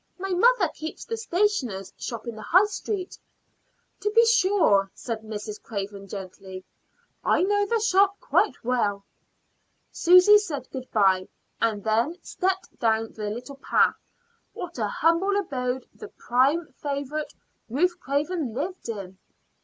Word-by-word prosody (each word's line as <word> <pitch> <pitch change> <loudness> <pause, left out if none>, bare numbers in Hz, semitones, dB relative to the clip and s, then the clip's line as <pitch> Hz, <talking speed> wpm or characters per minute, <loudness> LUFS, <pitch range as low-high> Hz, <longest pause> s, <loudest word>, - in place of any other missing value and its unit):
My 385 +1 -4
mother 475 +8 +4
keeps 315 +1 -7
the 455 - -3
stationer's 350 - -1
shop 230 -2 -6
in 235 -2 -5
the 215 - -9
High 370 - +5
Street." 410 -2 -5 0.8
"To 420 - 0
be 460 +2 +5
sure," 375 - +3
said 230 -3 -5
Mrs. 210 -1 -7
Craven 200 -2 -6
gently. 190 -1 -8 0.6
"I - - +3
know 410 +1 +2
the 460 +2 +1
shop 400 -2 +3
quite - - +1
well." 210 -5 0 0.9
Susy 365 +4 +7
said 295 - -5
good 260 -1 -7
bye, 190 -4 +3 0.3
and 215 -3 0
then 230 +10 +1
stepped 380 -1 -2
down 225 -1 +1
the 210 -1 -5
little 250 +6 -7
path. - - +3 0.6
What 345 -6 -7
a 215 - +1
humble 335 - +2
abode 255 -8 -2
the 430 - -10
prime 275 -1 +1
favorite, 285 +1 -3 0.3
Ruth 345 +9 +1
Craven, 285 -2 -2
lived 345 0 -4
in! 195 -4 -6
280 Hz, 140 wpm, -25 LUFS, -, 0.9 s, Susy